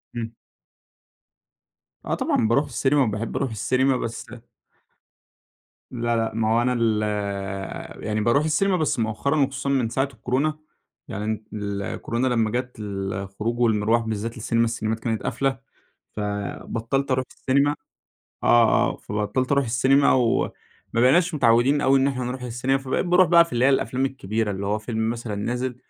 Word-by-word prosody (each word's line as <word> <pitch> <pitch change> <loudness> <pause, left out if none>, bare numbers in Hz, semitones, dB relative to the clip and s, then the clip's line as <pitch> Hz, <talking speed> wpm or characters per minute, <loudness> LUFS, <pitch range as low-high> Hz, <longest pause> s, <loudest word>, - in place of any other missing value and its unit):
إمم. 115 -1 -4 1.7
آه - - 0
طبعًا، 110 - +1
باروح 140 +6 +2
السينما 135 +3 +2
وباحب 110 0 -3
اروح 130 - -1
السينما 130 +4 +1
بس 115 -1 -5 1.7
لا، 120 -1 -1
لا، 115 -1 -1
ما 110 -1 0
هو 120 - +3
أنا 125 +1 +1
ال 110 -2 +1 1.0
يعني 110 0 -1
باروح 130 +7 +3
السينما 185 +5 +2
بس 155 -6 0
مؤخرًا 115 +7 0
وخصوصًا 135 0 -1
من 130 -5 +1
ساعة 135 +3 0
الكورونا، 135 +7 -1 0.5
يعني 110 +2 -3
ال 100 -1 -3
الكورونا 120 +5 -2
لمَّا 115 -3 +1
جات، 125 0 -3
الخروج 100 +3 -4
والمرواح 110 0 +2
بالذات 115 +1 -4
للسينما، 115 +1 +1
السينمات 115 -1 -2
كانت 110 -2 -2
قافلة، 135 -2 -1 0.6
فبطَّلت 115 +6 -3
اروح 130 0 +1
السينما، 140 +2 +1 0.7
آه، 120 -1 +5
آه، - - -10
فبطَّلت 105 +6 -2
اروح 140 -1 +3
السينما، 130 +4 +3
وما 125 -3 +2 0.4
بقيناش 155 +9 +4
متعوِّدين 125 +2 +3
أوي 135 0 +4
إن 135 - +3
احنا 130 -2 -3
نروح 125 +1 -4
السينما، 125 +3 0
فبقيت 135 +6 -2
باروح 180 -1 +5
بقى 170 -1 +7
في 165 - -15
اللي 120 +2 +1
هي 140 - +6
الأفلام 135 -1 +1
الكبيرة، 110 -4 -2
اللي 100 0 -4
هو 105 +1 0
فيلم 110 0 -2
مثلًا 115 -3 -4
نازل، 125 +4 -2
120 Hz, 150 wpm, -24 LUFS, 110-135 Hz, 1.7 s, بقى